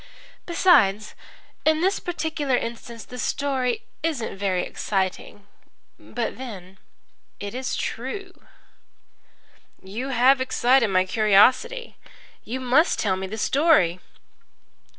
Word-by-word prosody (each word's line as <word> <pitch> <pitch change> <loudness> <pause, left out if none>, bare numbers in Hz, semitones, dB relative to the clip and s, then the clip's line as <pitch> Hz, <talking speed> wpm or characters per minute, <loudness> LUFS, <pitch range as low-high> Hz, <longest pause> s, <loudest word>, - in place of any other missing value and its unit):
Besides, 245 - +3 0.5
in 315 0 +2
this 380 +3 +1
particular 315 -6 -2
instance 230 -1 -6
the 250 - -9
story 255 -3 -1 0.2
isn't 300 -11 -2
very 190 -2 -1
exciting. 195 +1 -3 0.5
But 240 0 -5
then 195 -7 -9 0.6
it's 245 +6 -4
true." 370 - -5 1.5
"You 215 +8 -5
have 260 +1 +4
excited 255 -1 +3
my 185 -2 +2
curiosity. 240 - +3 0.5
You 255 +3 -5
must 260 +7 +3
tell 195 -3 0
me 190 0 -5
the 215 +3 -6
story." 220 - +3
245 Hz, 100 wpm, -24 LUFS, 205-285 Hz, 1.5 s, have